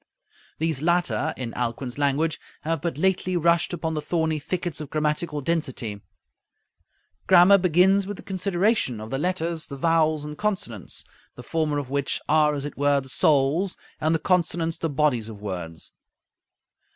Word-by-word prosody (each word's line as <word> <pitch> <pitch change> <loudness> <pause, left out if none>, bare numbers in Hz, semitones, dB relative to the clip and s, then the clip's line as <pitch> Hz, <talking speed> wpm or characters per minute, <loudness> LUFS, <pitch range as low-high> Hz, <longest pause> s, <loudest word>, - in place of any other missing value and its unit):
These 160 -3 -1
latter, 170 -2 +1
in 120 -3 -5
Alcuin's 125 +2 -3
language, 145 +3 +1 0.2
have 165 -1 -2
"but 170 -3 -2
lately 185 +1 +1
rushed 170 0 +2
upon 165 -2 -2
the 155 - -2
thorny 160 -1 0
thickets 175 +1 -3
of 150 - -7
grammatical 150 0 -1
density" 130 -9 -2 1.3
Grammar 190 +2 +7
begins 185 +3 +4
with 205 -1 -5
the - - -11
consideration 190 - 0
of 110 +1 -8
the 135 - -1
letters, 170 -1 0
the 140 - -7
vowels 155 0 +2
and 150 0 -6
consonants, 190 - -3 0.3
the 125 - -10
former 155 +1 -1
of 140 -3 -4
which 140 -1 -1
"are, 150 -1 +3
as 140 0 -4
it 145 - -7
were, 145 0 +3
the 135 -1 -9
souls, 150 +7 +2 0.2
and 155 +1 +2
the - - +3
consonants 165 -1 0
the 165 - -1
bodies 140 -7 +1
of 105 -2 -9
words." 90 -5 -6
155 Hz, 160 wpm, -25 LUFS, 140-175 Hz, 1.3 s, Grammar